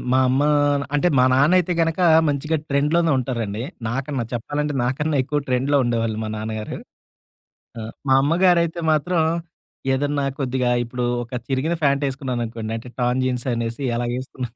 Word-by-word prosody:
మా 130 Hz, -, +4 dB
అమ్మా 140 Hz, +4 st, +2 dB, 0.5 s
అంటే 145 Hz, +5 st, +3 dB
మా 125 Hz, -, +6 dB
నాన్న 140 Hz, +6 st, +4 dB
అయితే 180 Hz, 0 st, 0 dB
గనుక 165 Hz, +2 st, 0 dB, 0.3 s
మంచిగా 150 Hz, +3 st, 0 dB
ట్రెండ్‌లో‌నే 155 Hz, +4 st, +2 dB
ఉంటారండి. 115 Hz, -4 st, -3 dB, 0.3 s
నాకన్నా 135 Hz, +1 st, -2 dB
చెప్పాలంటే 145 Hz, +5 st, -2 dB
నాకన్నా 145 Hz, +4 st, 0 dB
ఎక్కువ 145 Hz, +3 st, -1 dB
ట్రెండ్‌లో‌ 135 Hz, +3 st, +2 dB
ఉండేవాళ్ళు 115 Hz, -2 st, -1 dB
మా -, -, -4 dB
నాన్నగారు. 110 Hz, 0 st, -4 dB, 1.0 s
ఆ! -, -, -5 dB, 0.3 s
మా 130 Hz, -, +5 dB
అమ్మగారైతే 170 Hz, +1 st, +3 dB
మాత్రం 165 Hz, +3 st, +1 dB, 0.7 s
ఏదన్నా 145 Hz, +1 st, 0 dB, 0.2 s
కొద్దిగా 130 Hz, -2 st, 0 dB
ఇప్పుడు 120 Hz, +1 st, -4 dB, 0.2 s
ఒక 120 Hz, -, -10 dB
చిరిగిన 140 Hz, +5 st, 0 dB
ఫ్యాంటేసుకున్నాననుకోండి. 130 Hz, -5 st, -1 dB
అంటే 115 Hz, +2 st, -8 dB
టర్న్ 125 Hz, +1 st, +1 dB
జీన్స్ 125 Hz, -1 st, -2 dB
అనేసి 115 Hz, +3 st, -3 dB
ఎలా 120 Hz, 0 st, -1 dB
ఏసుకున్నా 130 Hz, -1 st, -6 dB
130 Hz, 140 wpm, -22 LUFS, 120-150 Hz, 1.0 s, మా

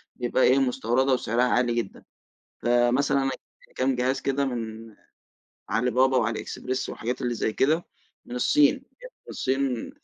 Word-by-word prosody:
بيبقى 125 Hz, +1 st, 0 dB
إيه 130 Hz, +2 st, +5 dB
مستوردة 130 Hz, 0 st, +1 dB
وسعرها 120 Hz, -1 st, +1 dB
عالي 125 Hz, -1 st, +2 dB
جدًا، 115 Hz, -4 st, -4 dB, 0.6 s
فمثلًا 120 Hz, +4 st, +2 dB
أنا 135 Hz, -, 0 dB
جبت 130 Hz, -, -14 dB
كام 130 Hz, 0 st, +1 dB
جهاز 130 Hz, +2 st, 0 dB
كده 140 Hz, 0 st, 0 dB
من 115 Hz, -3 st, -6 dB, 0.7 s
على 125 Hz, +4 st, +1 dB
بابا 130 Hz, +2 st, +3 dB
وعلى 115 Hz, -2 st, 0 dB
اكسبرس 130 Hz, +1 st, -4 dB
والحاجات 125 Hz, +4 st, -4 dB
اللي 120 Hz, -1 st, -1 dB
زي 110 Hz, -, -1 dB
كده 155 Hz, +9 st, +1 dB, 0.4 s
من 120 Hz, -, -7 dB
الصين، 145 Hz, +3 st, +4 dB
بجد -, -, -15 dB, 0.2 s
الصين 130 Hz, -2 st, -2 dB
125 Hz, 150 wpm, -25 LUFS, 120-135 Hz, 0.7 s, إيه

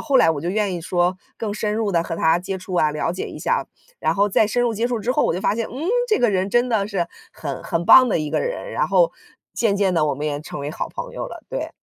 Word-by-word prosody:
后 280 Hz, -3 st, +2 dB
来 165 Hz, -, +6 dB
我 145 Hz, -3 st, -2 dB
就 170 Hz, -, -3 dB
愿 200 Hz, -1 st, 0 dB
意 170 Hz, -, -4 dB
说 175 Hz, +1 st, +1 dB, 0.2 s
更 215 Hz, -2 st, -3 dB
深 210 Hz, 0 st, -2 dB
入 215 Hz, -3 st, -1 dB
地 170 Hz, -1 st, +2 dB
和 165 Hz, -, -4 dB
他 160 Hz, +1 st, +3 dB
接 190 Hz, +2 st, -4 dB
触 185 Hz, 0 st, -9 dB
啊， 155 Hz, -3 st, +3 dB
了 150 Hz, +3 st, -1 dB
解 185 Hz, -, -4 dB
一 -, -, -9 dB
下。 -, -, 0 dB, 0.3 s
然 -, -, +1 dB
后 205 Hz, 0 st, +2 dB
再 210 Hz, -, +4 dB
深 245 Hz, +3 st, 0 dB
入 240 Hz, -, +1 dB
接 225 Hz, +2 st, 0 dB
触 245 Hz, -2 st, -1 dB
之 240 Hz, +4 st, -1 dB
后， -, -, +2 dB
我 -, -, 0 dB
就 185 Hz, -, -4 dB
发 205 Hz, -, +2 dB
现， 230 Hz, 0 st, -2 dB
嗯， 270 Hz, +7 st, -6 dB, 0.2 s
这 430 Hz, -, +3 dB
个 240 Hz, -3 st, +3 dB
人 190 Hz, 0 st, 0 dB
真 240 Hz, +3 st, +2 dB
的 205 Hz, -3 st, +1 dB
是 185 Hz, -5 st, -1 dB, 0.3 s
很 140 Hz, -4 st, -5 dB
很 170 Hz, 0 st, -2 dB
棒 255 Hz, +5 st, +8 dB
的 185 Hz, -, +1 dB
一 150 Hz, -1 st, -3 dB
个 -, -, 0 dB
人， -, -, -4 dB
然 -, -, 0 dB
后 -, -, +4 dB, 0.4 s
渐 210 Hz, -4 st, +1 dB
渐 195 Hz, -2 st, +2 dB
地 155 Hz, -3 st, +2 dB
我 145 Hz, -, 0 dB
们 150 Hz, +2 st, -4 dB
也 145 Hz, -1 st, -2 dB
成 155 Hz, -, -7 dB
为 145 Hz, +1 st, -4 dB
好 -, -, -4 dB
朋 -, -, -7 dB
友 -, -, -4 dB
了， -, -, -9 dB
对。 -, -, -3 dB
195 Hz, 315 characters per minute, -22 LUFS, 170-225 Hz, 0.4 s, 棒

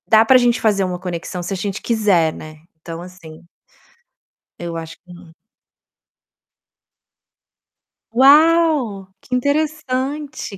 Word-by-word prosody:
Dá 220 Hz, 0 st, +5 dB
pra 260 Hz, +3 st, +6 dB
gente 245 Hz, -1 st, +2 dB
fazer 205 Hz, -3 st, +2 dB
uma 180 Hz, -1 st, -3 dB
conexão 180 Hz, 0 st, -6 dB
se 185 Hz, -, -4 dB
a -, -, -3 dB
gente 200 Hz, +1 st, -4 dB
quiser, 200 Hz, -9 st, +1 dB
né, 155 Hz, 0 st, -11 dB, 0.2 s
então, 165 Hz, +1 st, -8 dB
assim 175 Hz, -3 st, -13 dB, 1.1 s
eu 170 Hz, -1 st, -6 dB
acho 165 Hz, 0 st, -8 dB
que 180 Hz, -1 st, -15 dB
não. 175 Hz, -1 st, -15 dB, 2.8 s
Uau! 285 Hz, -, +4 dB
Que -, -, -9 dB
interessante, 285 Hz, -3 st, -2 dB
205 Hz, 115 wpm, -19 LUFS, 175-265 Hz, 2.8 s, pra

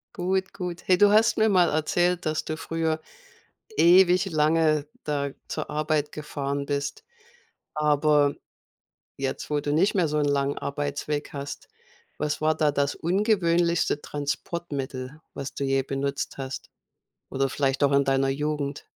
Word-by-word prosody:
Gut, 190 Hz, +1 st, -1 dB
gut. 180 Hz, -1 st, -5 dB
Hey, 180 Hz, -1 st, +5 dB
du 205 Hz, +1 st, +6 dB
hast 220 Hz, +2 st, +4 dB
mir 220 Hz, 0 st, +4 dB
mal 180 Hz, -3 st, +4 dB
erzählt, 175 Hz, +3 st, +1 dB
dass 155 Hz, 0 st, -1 dB
du 155 Hz, -, -3 dB
früher 160 Hz, 0 st, -2 dB, 0.8 s
ewig 180 Hz, +2 st, +6 dB
lange 155 Hz, -1 st, +2 dB, 0.2 s
da 145 Hz, -2 st, -1 dB, 0.2 s
zur -, -, -4 dB
Arbeit 150 Hz, -1 st, 0 dB
gefahren 140 Hz, -2 st, -4 dB
bist. 145 Hz, -, -3 dB, 0.7 s
Aber 150 Hz, -1 st, +3 dB, 0.8 s
jetzt, 135 Hz, -1 st, -3 dB
wo 150 Hz, -1 st, 0 dB
du 145 Hz, -, -2 dB
nicht 180 Hz, +8 st, +3 dB
mehr 180 Hz, -4 st, +3 dB
so 150 Hz, 0 st, -1 dB
'n 145 Hz, -, +2 dB
langen 140 Hz, 0 st, 0 dB
Arbeitsweg 145 Hz, +1 st, -3 dB
hast, 140 Hz, 0 st, -7 dB, 0.5 s
was 150 Hz, +1 st, -2 dB
war 155 Hz, 0 st, +3 dB
da 150 Hz, -2 st, +2 dB
das 140 Hz, 0 st, 0 dB
ungewöhnlichste 175 Hz, -4 st, +1 dB
Transportmittel, 145 Hz, -2 st, -4 dB
was 140 Hz, -1 st, -6 dB
du 140 Hz, -, -3 dB
je 135 Hz, 0 st, +2 dB
benutzt 140 Hz, +1 st, -3 dB
hast? 135 Hz, 0 st, -6 dB, 0.6 s
Oder 135 Hz, 0 st, -1 dB
vielleicht 135 Hz, 0 st, +1 dB
auch 140 Hz, -, +3 dB
in 140 Hz, 0 st, +4 dB
deiner 135 Hz, 0 st, +2 dB
Jugend? 145 Hz, 0 st, -3 dB
150 Hz, 145 wpm, -26 LUFS, 140-170 Hz, 0.8 s, du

